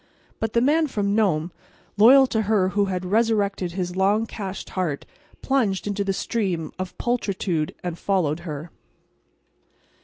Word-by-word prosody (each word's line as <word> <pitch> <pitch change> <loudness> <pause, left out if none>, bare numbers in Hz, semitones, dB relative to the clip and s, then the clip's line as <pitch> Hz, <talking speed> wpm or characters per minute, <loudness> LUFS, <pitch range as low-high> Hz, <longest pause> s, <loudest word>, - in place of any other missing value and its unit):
But 225 -1 -2
the 235 - +3
Man 305 +5 +3
from 200 -6 -1
Nome, 180 -6 +1 0.4
loyal 255 +6 +7
to 225 -4 0
her 205 -3 +2
who 205 +1 +1
had 185 -1 -3
resurrected 200 -3 +1
his 180 -1 -3
long 200 +4 +2
cached 195 -4 -6
heart, 170 -7 -2 0.4
plunged 230 -9 +1
into 205 0 -1
the 195 - 0
stream 185 -6 -2
of 185 -1 -5
pulchritude 195 -9 -1
and 175 -2 -4
followed 170 -6 0
her. 155 -1 -7
195 Hz, 145 wpm, -24 LUFS, 180-220 Hz, 0.4 s, loyal